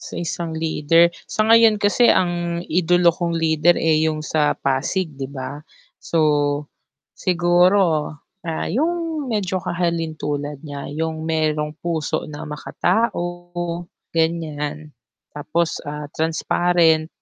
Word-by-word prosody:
Sa - - -7
isang 170 0 -3
leader, 160 +1 +3 0.2
sa 215 0 -1
ngayon 225 -2 +6
kasi 210 +4 +4
ang 175 -1 0
idolo 175 +1 +3
kong 170 0 0
leader 165 +1 +2
eh, 160 -1 +3
yung 155 -1 0
sa 155 -1 +1
Pasig 140 +7 -1
'di 135 - -4
ba? 140 +2 -7 0.3
So, 165 - -3 1.0
siguro, 175 -2 +3 0.3
ah, 165 -1 -3
yung 325 +3 -1
medyo 190 -3 -1
kahalintulad 160 -5 -2
niya, 145 -2 -7
yung 160 +1 -3
merong 155 -1 0
puso 165 -3 -2
na 145 -1 -7
makatao, 175 0 -2 0.2
ganyan. 155 -2 -2 0.4
Tapos 155 +3 -1
ah, 150 0 -5
transparent. 160 0 +2
165 Hz, 110 wpm, -21 LUFS, 155-175 Hz, 1.0 s, ngayon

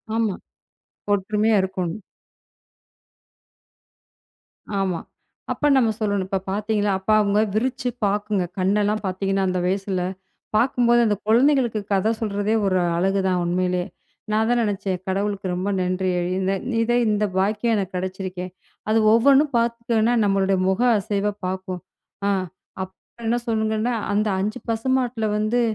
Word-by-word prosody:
ஆமா, 220 -4 +1 0.8
ஒற்றுமையா 210 +2 +2
இருக்கோணும். 190 +1 -3 2.8
ஆமா. 185 -3 0 0.5
அப்ப 295 - +1
நம்ம 235 -4 +3
சொல்லணும். 205 -3 0
"இப்போ 195 0 -1
பாத்தீங்களா?" 210 0 0
அப்பா, 205 +3 +1
அவங்க 205 +1 +2
விரிச்சு 250 +2 0 0.2
பாக்குங்க. 205 -1 0 0.2
கண்ணெல்லாம் 205 +3 +1
பாத்தீங்கன்னா, 195 +1 -1
அந்த 180 0 -1
வயசுல. 190 0 -1 0.5
பாக்கும்போது 240 0 +3
அந்தக் 205 -1 -1
குழந்தைகளுக்குக் 235 -4 +2
கதை 195 +3 +2
சொல்றதே 205 0 0
ஒரு 185 -1 +2 0.2
அழகு 195 +2 +1
தான், 180 -1 +1
உண்மையிலே. 180 0 0 0.5
நான் 220 +1 +2
தான் 245 0 +3
நெனைச்சேன். 195 -3 -1
"கடவுளுக்கு 195 0 -1
ரொம்ப 185 +3 -2
நன்றி. 185 +1 0 0.3
இந்த 190 +1 0 0.3
இதை 240 +1 +2
இந்த 210 0 +1
பாக்கியம் 210 +4 +1
எனக்கு 190 -3 -3
கெடைச்சிருக்கே." 185 0 -4 0.4
அது 225 +1 +4
ஒவ்வொண்ணும் 275 +4 +4
பாத்துட்டோம்னா, 235 0 +1
நம்மளோட 195 -1 +2
முக 190 +5 0 0.2
அசைவை 205 +1 -1
பாக்கும். 185 -1 -4 0.5
ஆ, - - +3 0.5
அப்புறம் 210 +5 -13
என்ன 235 +2 +2
சொல்லுங்கன்னா, 220 +1 0 0.2
"அந்த 210 +1 +1
5 215 +5 -2
பசுமாட்டுல 240 -1 0
வந்து 220 +3 +1
205 Hz, 125 wpm, -23 LUFS, 190-225 Hz, 2.8 s, அது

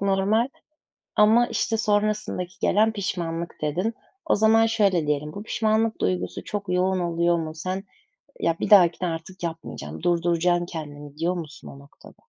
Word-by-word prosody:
normal. 200 +5 +2 0.7
Ama, 220 +3 +5
işte, 225 -1 -1
sonrasındaki 210 -4 -1
gelen 220 +2 +3
pişmanlık, 170 -4 -3
dedin. 180 +10 -1 0.3
O - - +3
zaman 220 +1 +4
şöyle 200 -8 +2
diyelim. 150 +1 -1
Bu, 200 - -7
pişmanlık 220 0 0
duygusu 90 0 -2
çok 200 -2 -5
yoğun 185 +1 +1
oluyor 170 0 +1
mu? 160 -1 -4
Sen, 185 +4 -4 0.6
"Ya, 165 0 +1
bir - - -2
dahakine 180 -2 +6
artık 170 +2 -7
yapmayacaksın. 150 - -6
Durduracaksın 175 0 +1
kendini." 145 -4 -8
diyor 175 +3 0
musun 160 -3 -8
o 140 - -11
noktada? 140 +1 -17
180 Hz, 145 wpm, -24 LUFS, 165-210 Hz, 0.7 s, dahakine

